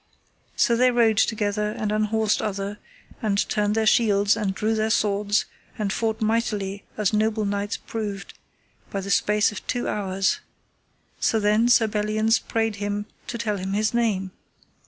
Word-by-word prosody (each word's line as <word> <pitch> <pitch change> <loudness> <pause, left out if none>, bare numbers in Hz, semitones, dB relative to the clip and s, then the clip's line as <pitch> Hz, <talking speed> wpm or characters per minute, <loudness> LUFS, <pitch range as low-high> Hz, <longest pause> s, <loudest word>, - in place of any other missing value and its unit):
So 235 - +3
they 255 +2 +4
rode 230 -3 +3
together, 210 -1 0
and 215 -1 -3
unhorsed 215 0 +1
other, 200 0 -3 0.4
and 210 -3 0
turned 210 0 +1
their 220 0 +1
shields, 205 -2 +4
and 205 -4 -2
drew 215 +3 0
their 220 0 0
swords, 205 -1 +1 0.3
and 210 -2 -1
fought 220 0 -1
mightily 210 -3 -1
as 210 -1 +1
noble 215 0 +1
knights 205 +1 -2
proved, 205 -3 -5 0.6
by 195 - -3
the 200 +1 -4
space 210 +1 +3
of 210 - -9
two 245 - -1
hours. 195 -2 0 0.8
So 225 - +2
then 215 +3 +3
Sir 240 -2 +5
Belliance 215 +2 +1
prayed 225 -2 -1
him 205 0 -3 0.2
to 240 - -4
tell 215 -3 -1
him 190 +1 -4
his 215 +2 +1
name. 205 -5 0
210 Hz, 155 wpm, -24 LUFS, 205-220 Hz, 0.8 s, Sir